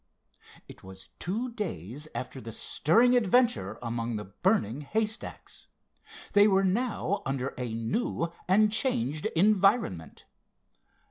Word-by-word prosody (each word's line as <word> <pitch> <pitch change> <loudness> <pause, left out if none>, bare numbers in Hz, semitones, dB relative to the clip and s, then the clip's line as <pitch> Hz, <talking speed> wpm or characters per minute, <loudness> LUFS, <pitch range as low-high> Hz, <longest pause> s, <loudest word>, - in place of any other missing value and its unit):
It - - -13
was 95 0 -12
two 225 +8 -3
days 150 - -5
after 130 +1 -5
the 115 -2 -8
stirring 230 - +3
adventure 195 - +2
among 115 0 -3
the 105 - -5
burning 125 - 0
haystacks. 215 +8 -4 0.7
They 205 +1 +6
were 195 -1 +3
now 205 +1 0
under 135 0 -2
a 125 -2 -4
new 115 - -2 0.2
and 210 +3 +4
changed 155 - 0
environment. 195 - +2
170 Hz, 115 wpm, -28 LUFS, -, 0.7 s, They